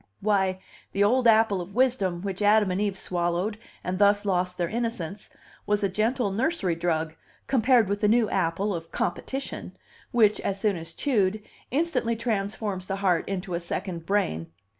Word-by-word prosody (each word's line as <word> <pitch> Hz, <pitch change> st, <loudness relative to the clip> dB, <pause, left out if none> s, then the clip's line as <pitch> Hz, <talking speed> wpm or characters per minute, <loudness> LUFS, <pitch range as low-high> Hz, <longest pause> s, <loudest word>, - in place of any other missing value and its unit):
Why, 190 Hz, -3 st, +1 dB, 0.4 s
the 200 Hz, -, +3 dB
old 245 Hz, +4 st, +3 dB
apple 220 Hz, -4 st, +4 dB
of 190 Hz, +3 st, -9 dB
wisdom, 200 Hz, -9 st, +1 dB
which 195 Hz, 0 st, -4 dB
Adam 205 Hz, -1 st, +4 dB
and 185 Hz, +2 st, -1 dB
Eve 200 Hz, -2 st, -1 dB
swallowed 180 Hz, +4 st, -1 dB, 0.2 s
and 185 Hz, +1 st, -3 dB
thus 205 Hz, 0 st, +4 dB
lost 180 Hz, -2 st, 0 dB
their 175 Hz, -, 0 dB
innocence, 210 Hz, -4 st, -4 dB, 0.4 s
was 205 Hz, 0 st, +1 dB
a 200 Hz, -, +2 dB
gentle 215 Hz, +3 st, 0 dB
nursery 220 Hz, -, 0 dB
drug 165 Hz, -2 st, -1 dB, 0.3 s
compared 250 Hz, -3 st, +4 dB
with 200 Hz, +1 st, -2 dB
the 210 Hz, -, +4 dB
new 225 Hz, +1 st, +4 dB
apple 190 Hz, +3 st, 0 dB
of 165 Hz, -1 st, -6 dB
competition, 270 Hz, +1 st, -4 dB, 0.3 s
which, 220 Hz, -4 st, +3 dB
as 195 Hz, 0 st, -2 dB
soon 205 Hz, -1 st, +1 dB
as 165 Hz, -1 st, -7 dB
chewed, 210 Hz, -6 st, +1 dB, 0.3 s
instantly 260 Hz, -5 st, 0 dB
transforms 205 Hz, -4 st, -2 dB
the 195 Hz, -, -1 dB
heart 190 Hz, -3 st, +1 dB
into 190 Hz, -1 st, -3 dB
a 170 Hz, -, 0 dB
second 170 Hz, -1 st, -4 dB
brain. 80 Hz, -, 0 dB
200 Hz, 165 wpm, -26 LUFS, 180-220 Hz, 0.4 s, apple